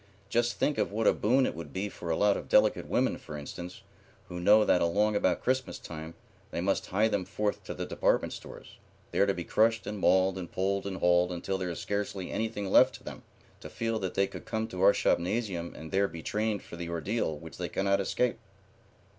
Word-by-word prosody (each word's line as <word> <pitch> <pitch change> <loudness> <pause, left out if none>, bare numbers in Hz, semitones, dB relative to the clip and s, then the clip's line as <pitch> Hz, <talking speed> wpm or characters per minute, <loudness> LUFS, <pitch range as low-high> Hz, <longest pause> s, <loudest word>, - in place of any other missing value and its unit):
Just 120 +1 +1
think 150 - +1
of - - 0
what 110 +2 -1
a - - +6
boon 130 +5 +3
it - - -1
would 75 -3 -8
be 95 +2 -2
for 90 -4 -8
a 80 - +2
lot 105 +2 +3
of - - -6
delicate - - +4
women, - - +1
for 75 - -8
instance, 85 +5 -8 0.5
who 90 - -5
know 105 +4 +6
that 90 - +3
along 105 +5 +2
about - - +1
Christmas 130 0 0
time 80 0 -8 0.3
they - - -4
must 95 +3 0
hie 105 +4 +2
them 100 -4 0
forth 105 +3 -2
to - - -5
the - - -4
department - - +1
stores, - - -11 0.3
there 100 - +3
to 100 - +2
be 85 - -4
crushed 115 +5 +2
and 105 -1 -4
mauled 95 0 +3
and 90 - -7
pulled 100 +1 -1
and 95 -1 -4
hauled 90 0 +3
until 95 +2 -3
there 90 -1 -2
is 85 - -4
scarcely 100 -2 -3
anything 110 -3 -2
left - - +6
to - - -13
them, - - -8 0.4
to - - -9
feel 115 -1 -2
that 95 -2 -4
they 100 - +3
could - - -9
come 110 0 -2
to 90 - -5
our 100 +1 +8
shopnasium 90 -2 -1
and 80 0 -9
there 100 +1 +2
be 85 -4 -9
trained 105 -1 -1
for 85 - -10
the 85 0 -5
ordeal 85 0 -1
which 80 +1 -11
they 90 -1 -3
cannot 100 0 +1
escape." 120 +5 0
95 Hz, 220 wpm, -29 LUFS, 90-105 Hz, 0.5 s, our